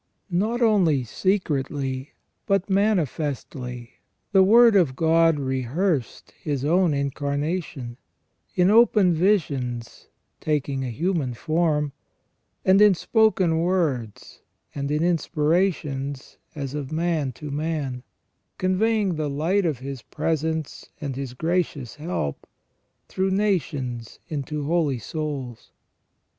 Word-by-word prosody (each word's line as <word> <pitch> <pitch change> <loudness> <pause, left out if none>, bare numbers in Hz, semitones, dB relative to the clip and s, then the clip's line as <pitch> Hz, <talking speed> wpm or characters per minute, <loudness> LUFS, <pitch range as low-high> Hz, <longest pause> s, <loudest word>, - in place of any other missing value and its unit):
Not 225 +7 +1
only 180 - +3
secretly 140 - -2 0.3
but 195 0 +1
manifestly, 145 - -1 0.3
the 195 -1 +6
Word 230 +3 +7
of 165 -10 +3
God 165 +1 +3
rehearsed 135 - -2
His 145 -3 -2
own 175 +2 +3
Incarnation, 140 -2 -2 0.6
in 180 +1 +4
open 215 -5 +5
visions 140 - -1 0.3
taking 140 -3 -1
a 130 - -3
human 150 - -1
form, 155 0 0 0.7
and 190 +2 +5
in 210 -2 +7
spoken 190 -5 +2
words, 160 - -1 0.3
and 140 -1 -3
in 150 +2 +1
inspirations 150 -4 0 0.2
as 140 -3 -4
of 145 -2 -5
man 160 -4 0
to 150 +4 -8
man, 145 -4 -2 0.6
conveying 195 0 +1
the 155 -2 -1
light 170 +7 +1
of 150 -5 -1
His 135 0 -7
presence 160 -1 -3
and 140 -3 -4
His 130 -2 -5
gracious 160 -5 -2
help 150 - -4 0.3
" - - -48
through 190 +1 -1
nations 145 - -1
into 150 -1 -3
holy 155 -4 +1
souls 135 -1 -5
155 Hz, 110 wpm, -24 LUFS, 135-180 Hz, 0.7 s, Word